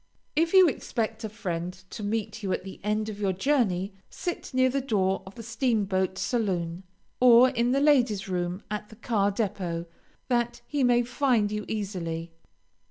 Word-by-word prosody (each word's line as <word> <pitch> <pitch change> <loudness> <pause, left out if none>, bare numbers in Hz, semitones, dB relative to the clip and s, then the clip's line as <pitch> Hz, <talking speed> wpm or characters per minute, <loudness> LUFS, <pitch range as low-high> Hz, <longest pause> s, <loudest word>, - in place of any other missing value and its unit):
If 330 +3 +2
you 375 -2 +8
expect 225 -5 -2
a 220 - -3
friend 180 -5 -4 0.2
to - - -7
meet 215 +1 -2
you 195 -2 -2
at - - -2
the 190 0 -9
end 215 +1 0
of 210 -2 -6
your 195 -2 +1
journey, 195 -4 +1 0.2
sit 350 -1 -5
near 260 -1 +3
the 275 +2 0
door 195 -7 +1
of 190 - -11
the 230 - -8
steam 230 -1 0
boat 190 -1 0
saloon, 180 -8 -1 0.4
or 250 0 +7
in 240 -1 +1
the 275 - +3
ladies' 245 -9 +3
room 180 0 -2
at 210 0 -4
the 220 - -13
car 215 -3 +1
depot, 185 -5 -2 0.4
that 240 -1 0
he 290 -2 -1
may 245 -1 +4
find 245 -4 +1
you 210 -1 -3
easily. 170 -6 -4
215 Hz, 175 wpm, -27 LUFS, 190-245 Hz, 0.4 s, you